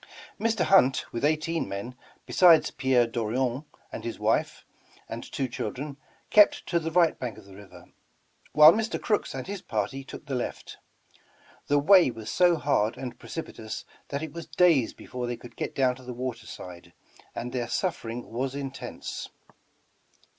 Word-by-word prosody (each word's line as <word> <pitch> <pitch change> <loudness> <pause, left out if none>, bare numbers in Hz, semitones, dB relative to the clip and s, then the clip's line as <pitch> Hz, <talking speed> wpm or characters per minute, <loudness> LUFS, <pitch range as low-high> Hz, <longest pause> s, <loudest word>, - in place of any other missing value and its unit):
Mr. 225 -3 +1
Hunt, 135 -9 +4
with 115 - -3
eighteen 155 +2 0
men, 100 +6 -5 0.3
besides 170 -3 +5
Pierre 130 -2 +3
Dorion 120 +4 -1 0.3
and - - -6
his - - -4
wdfe - - 0 0.4
and - - -6
two 135 - -1
children, 130 +3 -5 0.3
kept 210 -1 +6
to 170 - +1
the 160 0 -3
right 170 0 +3
bank 120 -5 -4
of 110 - -13
the 100 - -14
river, 100 0 -14 0.7
while 150 +1 +9
Mr. 220 +1 -1
Crooks 210 -10 -1
and 130 - -5
his 200 -1 -5
party 110 +6 -3
took 135 - -10
the 140 - -5
left. 125 - -4 0.9
The 145 - +3
way 175 +3 +6
was 110 -3 -6
so 175 -1 +4
hard 120 -7 +1
and 125 -2 -7
precipitous 115 -9 -7 0.2
that 140 +2 -3
it 155 -2 -6
was 170 -1 -7
days 160 -6 +3
before 125 -1 -6
they 120 -1 -3
could 120 +1 -13
get - - -4
down 130 -2 +2
to 130 - -14
the 125 -1 -7
water 120 -3 -5
side, 90 -1 -10 0.4
and 120 +1 -4
their 120 -2 -2
suffering 120 -5 -3
was 130 +3 -2
intense. 135 -1 -6
130 Hz, 165 wpm, -27 LUFS, 120-160 Hz, 0.9 s, while